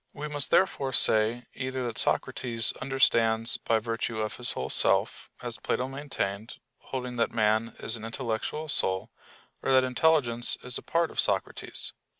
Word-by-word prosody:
We 150 +1 -5
must 145 -2 +3
therefore 140 -8 +1
say 115 +2 +3
either 130 -1 -4
that 120 -2 -1
Socrates 115 -2 +1
understands 115 -4 +2
by 115 - 0
virtue 115 0 -3
of 110 -1 -3
his 125 - -2
whole - - -3
self, - - +1
as - - -4
Plato 130 - -2
maintained, 130 -6 -5 0.2
holding 125 -2 -6
that 115 - +1
man 110 0 0
is 115 - +2
an 110 - -10
intellectual 115 +6 -4
soul; 95 -5 +1 0.5
or - - -1
that 130 0 +5
intelligence 125 -3 +1
is 125 0 -2
a - - -12
part 170 0 0
of - - -6
Socrates. - - -1
120 Hz, 155 wpm, -27 LUFS, 115-135 Hz, 0.5 s, that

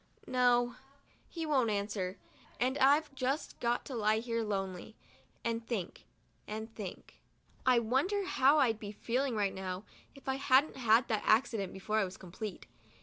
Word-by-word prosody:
No, 245 -1 +2 0.5
he 330 -2 -4
won't 265 -7 +2
answer 200 -2 -2 0.2
— - - -27
and 255 +2 +1
I've 285 +2 +4
just 270 +3 -2
got 240 0 0
to 275 - -7
lie 215 -2 +2
here 230 0 -1
lonely, 195 -1 -3 0.5
and 230 0 -1
think, 205 -8 -4 0.4
and 220 +1 -6
think. 200 -5 -8 0.5
I 255 -1 +6
wonder 275 - +1
how 280 -3 +4
I'd 230 -7 +3
be 205 -1 -6
feeling 245 +4 -1 0.2
now 190 0 -5 0.3
if 275 - -16
I 265 0 0
hadn't 270 +1 +3
had 230 -1 +4
that 215 -2 +1
accident 215 -4 +2
before 210 +3 -1
I - - +3
was 185 0 -5
complete. 190 +2 -7
230 Hz, 155 wpm, -33 LUFS, 210-260 Hz, 0.5 s, I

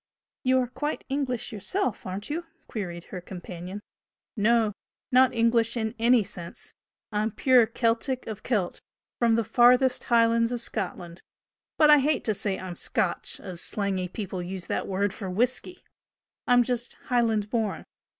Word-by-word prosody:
"You 260 0 +3
are - - 0
quite 295 +5 -4
English 260 -3 -2
yourself, 220 - -2
aren't 195 +8 -5
you?" 335 +2 -3 0.2
queried 175 -6 -5
her 180 - -4
companion. 180 +2 -8 0.5
"No 220 0 +3 0.4
not 255 0 +6
English 230 0 +2
in 220 -1 -1
any 235 0 +5
sense. 170 -3 -7 0.4
I'm 215 +1 0
pure 245 +1 +4
Celtic 235 +3 0
of 220 -3 -6
Celt, 205 -8 -1 0.4
from 230 -2 +4
the 230 - +2
farthest 250 +3 +4
Highlands 230 0 +3
of 245 - -2
Scotland. 180 -5 -4 0.6
But 305 -1 +6
I 295 - +8
hate 285 +1 +1
to 215 - +1
say 195 -1 0
I'm 185 -2 -6
'Scotch,' - - -1
as 185 -3 -6
slangy 195 -3 -1
people 190 -1 -5
use 180 +1 -6
that - - -2
word 195 +1 0
for 200 -3 -6
whisky! 250 - -1 0.6
I'm 245 0 +6
just 240 0 -2 0.2
Highland 225 -4 +2
born. 220 -4 -1
225 Hz, 150 wpm, -27 LUFS, 195-245 Hz, 0.6 s, I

